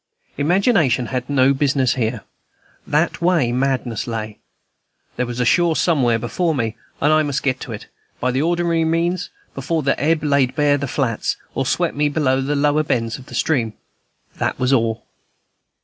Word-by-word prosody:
Imagination 160 - +2
had 125 +1 -2
no 135 -1 +4
business 135 -3 +1
here. 115 -3 -2 0.6
That 155 +4 0
way 170 -9 +2
madness 125 -3 -1
lay. 110 -2 -5 0.8
There 125 - -1
was 120 0 -5
a 125 - +1
shore 170 +5 +3
somewhere 130 -11 +2
before 160 +8 -1
me, 115 -3 -2 0.2
and 150 +2 +3
I 155 - +4
must 145 -3 -2
get 130 -2 0
to 125 - -7
it, 105 - -7 0.3
by 125 - 0
the 130 +2 0
ordinary 170 0 +1
means, 170 +2 0 0.2
before 155 +4 -2
the 135 - +1
ebb 160 +1 +2
laid 140 -3 +2
bare 145 -2 +3
the 140 - -3
flats, 120 -4 -1 0.2
or - - -1
swept - - 0
me 145 +1 +1
below 135 -3 +1
the 145 +2 -1
lower 145 +1 +2
bends 115 -5 -1
of 130 - -14
the - - -9
stream. 120 -9 0 0.6
That - - -1
was 125 +1 +1
all. 115 -3 0
140 Hz, 175 wpm, -20 LUFS, 125-155 Hz, 0.8 s, no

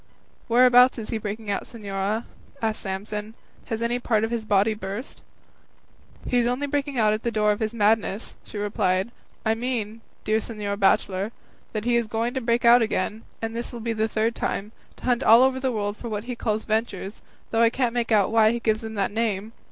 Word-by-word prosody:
"Whereabouts 250 +1 +6
is 220 -2 -6
he 225 - -1
breaking 210 0 -4
out, - - -2
señora?" 205 0 -3 0.4
asked 220 -1 -1
Samson; 210 +3 -5 0.3
"has 230 -1 -3
any 240 +1 0
part 220 -3 +1
of 225 - -1
his 230 -2 -2
body 205 +1 +3
burst?" 205 +4 -6 1.1
"He 245 - +2
is 240 - +2
only 250 +4 0
breaking 285 -1 -2
out 215 -2 +4
at 215 - -2
the 235 - -1
door 210 -2 +2
of 205 - -1
his 220 -1 -1
madness," 215 -1 +1
she - - -9
replied; 200 0 0 0.3
"I 220 - +3
mean, 225 -2 -3 0.2
dear 215 +1 +2
señor 210 -3 -4
bachelor, 195 +1 +2 0.4
that 215 0 -3
he 240 0 +3
is 235 -2 0
going 230 +3 -1
to 265 - -2
break 235 +1 +1
out 240 +1 +8
again 215 0 -1 0.2
(and 225 0 -3
this 235 +1 -4
will 240 - -7
be 230 0 -2
the 220 0 0
third 220 +1 0
time) 210 -1 -3 0.2
to - - -17
hunt 245 0 +2
all 230 +3 +7
over 260 0 +2
the 260 -1 0
world 205 -2 -2
for 235 - -6
what 210 -1 -3
he 245 +1 -5
calls 220 -2 -2
ventures, 215 -2 -2 0.3
though 225 - +2
I 230 - +6
can't 245 -1 0
make 240 -1 -1
out 205 -3 +4
why 220 -1 +5
he 235 - -2
gives 220 -2 0
them 220 -1 -6
that 200 -1 0
name. 220 -1 -2
220 Hz, 215 wpm, -25 LUFS, 210-235 Hz, 1.1 s, out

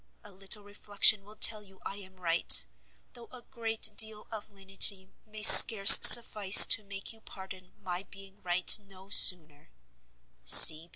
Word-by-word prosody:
A - - -17
little 195 +2 -15
reflection 205 0 -6
will 210 +2 -19
tell 215 0 -3
you 195 -2 -26
I 195 - -15
am 190 -2 -20
right, 165 - -4 0.5
though 235 -1 -22
a 250 -1 -20
great 225 -4 -8
deal 220 -1 -5
of 215 -1 -15
lenity 195 -1 -6 0.2
may 215 0 -16
scarce 205 -2 +5
suffice 210 -4 +3
to 220 - -5
make 200 +1 -15
you 225 - -22
pardon 190 -2 -21
my 180 -1 -13
being 195 0 -22
right 180 +3 -3
no 190 0 -23
sooner. 155 - -2
200 Hz, 150 wpm, -19 LUFS, 190-215 Hz, 0.5 s, scarce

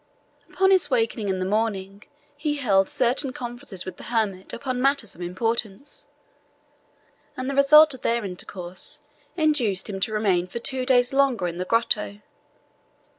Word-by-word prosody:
Upon 385 0 +3
his 375 -2 +4
awaking 225 -5 0
in 190 - 0
the 185 - -2
morning, 200 -1 -2 0.3
he 295 0 -2
held 195 -8 +2
certain 255 +2 +1
conferences 240 -7 -6
with 185 - -7
the - - -10
hermit 210 -5 -1
upon 255 0 -3
matters 275 -5 +1
of 175 - -13
importance, 225 +7 -3 1.3
and 255 0 -4
the 275 - -2
result 295 +2 +7
of 260 - -11
their 235 -2 0
intercourse 180 -1 -7 0.4
induced 250 - +1
him 195 - -5
to 205 - -1
remain 195 -5 +1
for 185 - -7
two 255 +1 -1
days 245 -1 +3
longer 270 -8 +2
in 170 0 -5
the 180 - -2
grotto. 210 -2 0
230 Hz, 155 wpm, -24 LUFS, 195-265 Hz, 1.3 s, result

